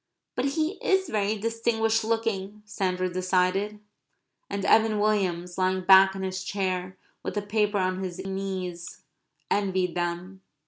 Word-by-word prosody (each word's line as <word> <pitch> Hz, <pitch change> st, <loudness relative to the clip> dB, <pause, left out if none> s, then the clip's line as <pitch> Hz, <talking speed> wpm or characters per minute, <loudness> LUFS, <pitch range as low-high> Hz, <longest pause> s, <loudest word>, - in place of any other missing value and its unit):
"But -, -, -1 dB
he 315 Hz, +7 st, -1 dB
is 380 Hz, -3 st, +2 dB
very 210 Hz, 0 st, 0 dB
distinguished 225 Hz, 0 st, 0 dB
looking," 215 Hz, -2 st, -2 dB
Sandra 185 Hz, -3 st, -1 dB
decided. 185 Hz, +3 st, 0 dB, 0.7 s
And 200 Hz, 0 st, -3 dB
Evan 220 Hz, -1 st, +4 dB
Williams, 185 Hz, -4 st, 0 dB
lying 185 Hz, 0 st, +1 dB
back 190 Hz, +1 st, +7 dB
in 190 Hz, -, -4 dB
his 185 Hz, 0 st, -3 dB
chair 185 Hz, -2 st, -2 dB, 0.2 s
with -, -, -5 dB
the 205 Hz, -, -1 dB
paper 210 Hz, 0 st, +1 dB
on 185 Hz, 0 st, 0 dB
his 180 Hz, -1 st, -5 dB
knees, 190 Hz, -3 st, -5 dB, 0.5 s
envied 190 Hz, -3 st, +1 dB
them. 175 Hz, +2 st, -3 dB
195 Hz, 135 wpm, -27 LUFS, 185-215 Hz, 0.7 s, back